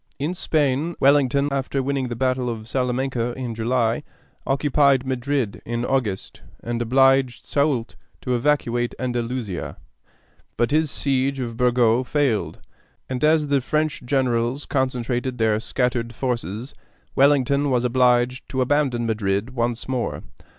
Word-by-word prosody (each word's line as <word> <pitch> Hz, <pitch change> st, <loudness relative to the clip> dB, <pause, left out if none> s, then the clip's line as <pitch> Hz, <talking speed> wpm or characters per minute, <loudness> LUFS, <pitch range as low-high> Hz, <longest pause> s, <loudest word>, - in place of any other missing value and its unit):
In 150 Hz, +6 st, -2 dB
Spain 155 Hz, -1 st, 0 dB
Wellington, 140 Hz, 0 st, +3 dB
after 135 Hz, 0 st, -1 dB
winning 135 Hz, -1 st, -1 dB
the 120 Hz, -, -4 dB
battle 130 Hz, 0 st, 0 dB
of 110 Hz, -2 st, -6 dB
Salamanca 125 Hz, -1 st, -1 dB
in 125 Hz, -2 st, -5 dB
July, 115 Hz, +1 st, 0 dB, 0.5 s
occupied 140 Hz, -1 st, +3 dB
Madrid 130 Hz, -3 st, -2 dB
in 120 Hz, +1 st, -3 dB
August, 120 Hz, -9 st, -2 dB, 0.2 s
and 120 Hz, 0 st, -2 dB
obliged 135 Hz, +1 st, +3 dB
Soult 140 Hz, -5 st, 0 dB, 0.3 s
to 125 Hz, -, -1 dB
evacuate 120 Hz, -2 st, 0 dB
Andalusia; 120 Hz, -6 st, -3 dB, 0.8 s
but 120 Hz, +3 st, +1 dB
his 155 Hz, 0 st, +2 dB
siege 135 Hz, 0 st, 0 dB
of 120 Hz, -3 st, -4 dB
Burgos 125 Hz, 0 st, +2 dB
failed, 115 Hz, -, 0 dB, 0.5 s
and 130 Hz, +2 st, -4 dB
as 155 Hz, -1 st, +3 dB
the 140 Hz, -1 st, +2 dB
French 155 Hz, +3 st, -1 dB
generals 125 Hz, 0 st, 0 dB
concentrated 125 Hz, -1 st, -1 dB
their 110 Hz, -2 st, +2 dB
scattered 120 Hz, -1 st, -1 dB
forces, 120 Hz, -1 st, -3 dB, 0.4 s
Wellington 140 Hz, 0 st, +3 dB
was 125 Hz, -2 st, +1 dB
obliged 125 Hz, 0 st, +2 dB
to 130 Hz, -, -1 dB
abandon 130 Hz, -3 st, +1 dB
Madrid 105 Hz, 0 st, -1 dB
once 120 Hz, -2 st, -2 dB
more. 130 Hz, -2 st, -2 dB
130 Hz, 130 wpm, -23 LUFS, 120-135 Hz, 0.8 s, Wellington